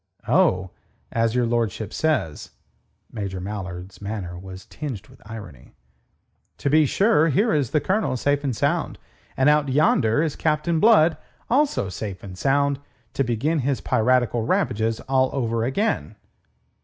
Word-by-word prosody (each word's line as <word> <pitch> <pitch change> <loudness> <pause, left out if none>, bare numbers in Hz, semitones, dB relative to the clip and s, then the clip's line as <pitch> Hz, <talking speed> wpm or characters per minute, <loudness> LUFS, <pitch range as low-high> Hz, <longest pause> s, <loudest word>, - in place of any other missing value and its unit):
"Oh, 95 0 +2 0.4
as 115 0 +1
your 125 -1 +2
lordship 115 -3 -1
says." 155 - -1 0.6
Major 100 -4 -4
Mallard's 95 -1 -7
manner 100 -4 -5
was 95 +1 -10
tinged 135 -10 -7
with - - -18
irony. 105 - -10 0.8
"To 140 - -1
be 155 -1 +5
sure, 195 - +3
here 205 - +2
is 145 -6 +1
the 150 - +2
Colonel 190 -9 0
safe 145 +3 0
and 135 -4 -1
sound. - - 0 0.4
And 130 - +3
out 150 -1 +4
yonder 130 -2 +3
is 155 -3 -2
Captain 160 +1 0
Blood, 175 -6 +5 0.3
also 280 - +2
safe 95 0 -6
and 95 -2 -8
sound, 140 +5 +1 0.3
to 135 - +1
begin 135 +7 0
his 135 0 0
piratical 120 0 +2
ravages 110 0 0
all 130 -1 +1
over 115 -4 -1
again." 200 - -1
125 Hz, 145 wpm, -23 LUFS, 105-150 Hz, 0.8 s, be